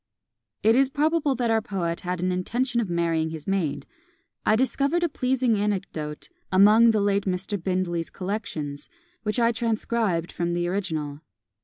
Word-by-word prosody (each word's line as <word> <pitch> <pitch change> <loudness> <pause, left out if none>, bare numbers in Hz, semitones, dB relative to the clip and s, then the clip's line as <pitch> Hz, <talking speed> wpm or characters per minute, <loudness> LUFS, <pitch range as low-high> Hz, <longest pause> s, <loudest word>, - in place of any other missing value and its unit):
It 225 +2 +5
is 270 +1 +4
probable 295 0 +1
that 240 -2 0
our 225 0 +3
poet 180 -6 -3
had 180 -1 -3
an 185 - +1
intention 235 +7 0
of 210 - -3
marrying 165 -2 0
his 160 -2 -7
maid. 190 -7 -1 0.6
I 215 - +5
discovered 275 +7 +1
a - - +3
pleasing 255 -4 +1
anecdote 190 -7 -3 0.2
among 210 +5 +6
the 220 -1 +3
late 200 0 +1
Mr. 190 0 -2
Bindley's 180 -3 -1
collections, 175 -8 -4 0.3
which 210 +2 -1
I 230 0 +4
transcribed 220 -6 0
from 170 0 -2
the 175 0 0
original. 155 -6 -3
200 Hz, 155 wpm, -25 LUFS, 175-235 Hz, 0.6 s, among